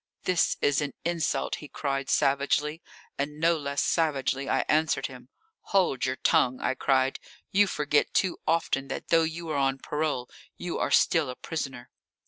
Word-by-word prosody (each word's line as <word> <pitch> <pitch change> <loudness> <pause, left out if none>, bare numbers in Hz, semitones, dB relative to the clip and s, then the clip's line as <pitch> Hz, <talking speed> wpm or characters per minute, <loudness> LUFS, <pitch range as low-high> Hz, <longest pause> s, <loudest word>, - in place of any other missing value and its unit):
"This 180 -2 +2
is 145 0 +2
an 145 -3 -3
insult," 170 -1 -1
he 150 - -10
cried 135 -2 -3
savagely, 145 +3 +1 0.4
and 150 +2 -3
no 165 +1 +4
less 140 -2 -1
savagely 140 -4 0
I - - +2
answered 155 -3 +2
him. 125 -1 -9 0.5
"Hold 175 -10 +3
your 130 - -1
tongue!" 130 -1 +2
I - - 0
cried. 130 0 +1 0.3
"You 205 +1 +4
forget 150 -4 +1
too 185 -2 +1
often 155 -4 +1
that 135 - -6
though 165 -1 +5
you 165 +1 -3
are 150 - -1
on 135 -1 +1
parole 145 -3 -2 0.3
you 175 -1 -4
are - - 0
still 160 -6 +3
a 125 - -5
prisoner." 135 -6 -5
145 Hz, 165 wpm, -27 LUFS, 135-165 Hz, 0.5 s, though